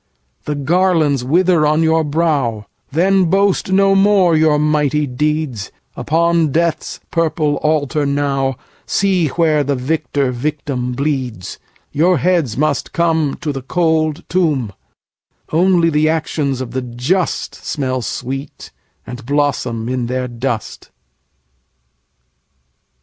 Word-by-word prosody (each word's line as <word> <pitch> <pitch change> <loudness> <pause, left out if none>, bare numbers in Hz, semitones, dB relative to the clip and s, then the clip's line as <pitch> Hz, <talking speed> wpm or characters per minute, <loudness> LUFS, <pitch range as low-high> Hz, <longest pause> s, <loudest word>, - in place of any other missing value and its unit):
The 150 - -2
garlands 155 -2 +1
wither 170 +4 +3
on 155 +2 +2
your 160 0 +2
brow; 145 -8 0 0.3
Then 185 +5 +3
boast 195 +2 +1
no 195 +1 +4
more 195 -3 +4
your 155 -1 +3
mighty 150 0 +1
deeds; 145 -5 -2 0.2
Upon 165 -1 +1
Death's 165 +1 -1
purple 155 -3 0
altar 150 -1 0
nowSee 145 +6 -1
where 155 -3 +3
the 140 0 -1
victor 140 0 -1
victim 125 -1 -3
bleeds:Your 140 - -2
heads 160 -6 0
must 145 -2 -1
comeTo 160 -2 0
the 135 - -5
cold 160 +1 0
tomb; 150 - 0 0.8
Only 170 0 +3
the 155 +1 +2
actions 150 -4 -1
of 125 -2 -5
the 130 +1 -2
justSmell 130 -1 -2
sweet, 135 +4 -6 0.3
and 125 0 -8
blossom 130 -4 -1
in 125 -1 -2
their 125 +1 -2
dust. 120 -1 -4
150 Hz, 105 wpm, -17 LUFS, 130-165 Hz, 0.8 s, no